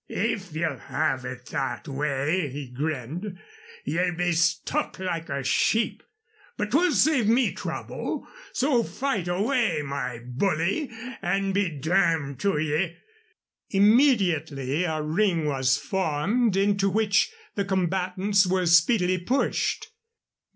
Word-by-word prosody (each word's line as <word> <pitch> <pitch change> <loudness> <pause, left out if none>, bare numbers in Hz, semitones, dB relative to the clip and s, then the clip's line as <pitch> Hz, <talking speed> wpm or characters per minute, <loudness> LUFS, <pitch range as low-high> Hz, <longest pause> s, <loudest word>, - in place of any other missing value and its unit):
"If 200 -4 -2
ye'll 155 -4 -2
have 135 -3 -1
it 125 0 -7
that 120 - -3
way," 145 +3 -1
he 140 0 -7
grinned, 155 - -4 0.5
"ye'll 180 +1 0
be 175 +1 0
stuck 170 - 0
like 170 -3 -3
a 140 -1 -2
sheep. 220 - +1 0.6
But 210 0 -2
'twill 340 +7 +3
save 275 -9 +3
me 240 +3 +3
trouble. - - -5 0.2
So 255 -2 +2
fight 230 -6 -2
away, 200 - +1
my 140 -4 -4
bully, 170 - 0 0.3
an' 195 0 0
be 195 -1 +1
dammed 155 -2 0
to 200 -5 +1
ye!" 155 +3 -1 0.7
Immediately 180 - +3
a 155 -2 -2
ring 165 +1 +1
was 135 -2 +2
formed, 190 +6 0
into 195 0 +2
which 210 - +2 0.2
the 200 - -1
combatants 190 +1 +1
were 185 0 +1
speedily 180 +2 +4
pushed. 245 +10 -1
180 Hz, 120 wpm, -26 LUFS, 150-205 Hz, 0.7 s, speedily